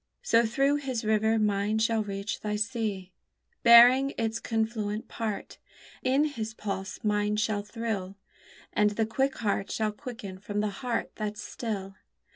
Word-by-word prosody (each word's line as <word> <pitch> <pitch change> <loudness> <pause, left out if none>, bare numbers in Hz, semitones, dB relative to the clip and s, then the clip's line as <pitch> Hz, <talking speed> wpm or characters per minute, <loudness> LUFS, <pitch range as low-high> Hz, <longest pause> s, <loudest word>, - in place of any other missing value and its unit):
So 230 - +4
through 275 +5 +2
his 260 -6 -3
river 220 +1 +3
mine 210 0 +1
shall 225 0 +2
reach 200 0 -4
thy 210 -1 -2
sea, 210 -4 -2 0.5
Bearing 245 +4 +7
its 225 0 -1
confluent 220 -2 -2
part; 220 -3 -5 0.4
In 265 +3 +3
his 225 -7 -4
pulse 195 -2 -5
mine 210 0 +1
shall 210 -1 0
thrill; 205 -3 -4 0.6
And 210 0 +4
the 225 - +2
quick 265 +5 0
heart 200 -3 -1
shall 215 -1 0
quicken 210 -5 -8
from 205 +1 -3
the 210 0 +1
heart 245 -3 -2
that's 215 0 -4
still. 200 -4 -5
220 Hz, 145 wpm, -28 LUFS, 205-230 Hz, 0.6 s, Bearing